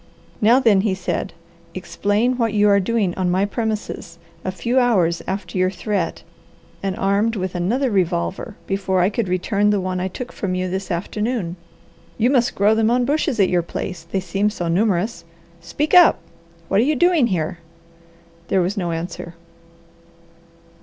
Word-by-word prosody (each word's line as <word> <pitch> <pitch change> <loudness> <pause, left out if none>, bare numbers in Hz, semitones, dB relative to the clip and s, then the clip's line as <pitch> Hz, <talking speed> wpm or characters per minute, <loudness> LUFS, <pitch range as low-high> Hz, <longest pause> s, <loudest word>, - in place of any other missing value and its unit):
"Now 230 +4 +5
then," 220 -7 +4
he 195 -2 0
said, 190 - -3 0.4
"explain 215 +5 0
what 230 -3 0
you 210 0 +4
are 200 0 +5
doing 200 -2 0
on 185 -1 -1
my 185 +3 +2
premises, 210 -5 -4 0.3
a 185 - -2
few 235 +8 0
hours 185 -9 +2
after 190 -1 -3
your 185 0 +3
threat, 195 -1 -3 0.6
and 195 -1 -2
armed 205 +4 +1
with 185 -2 -3
another 230 +9 0
revolver 185 +2 -1
before 190 -1 0
I 185 +4 +2
could 220 -1 -1
return 200 +3 +1
the 205 -1 +2
one 185 0 -2
I 185 - -1
took 245 +6 -7
from 185 -2 -3
you 185 0 -1
this 190 +1 -4
afternoon. 200 +1 -2 0.6
You 240 +3 +2
must 245 -4 +2
grow 205 +2 +4
them 220 0 +2
on 245 +1 +2
bushes 290 -3 0
at 195 - +4
your 175 -1 +2
place, 170 0 -6
they 195 - 0
seem 195 +3 0
so 180 -5 -4
numerous. 195 +4 0 0.4
Speak 285 - -3
up! 360 -2 +7 0.5
What 195 - +2
are - - +4
you 300 +4 +1
doing 335 -3 +3
here?" 170 -4 -2 0.9
There 190 - +2
was 180 +4 -1
no 180 -4 -2
answer. 170 +1 -5
195 Hz, 170 wpm, -21 LUFS, 180-230 Hz, 0.9 s, up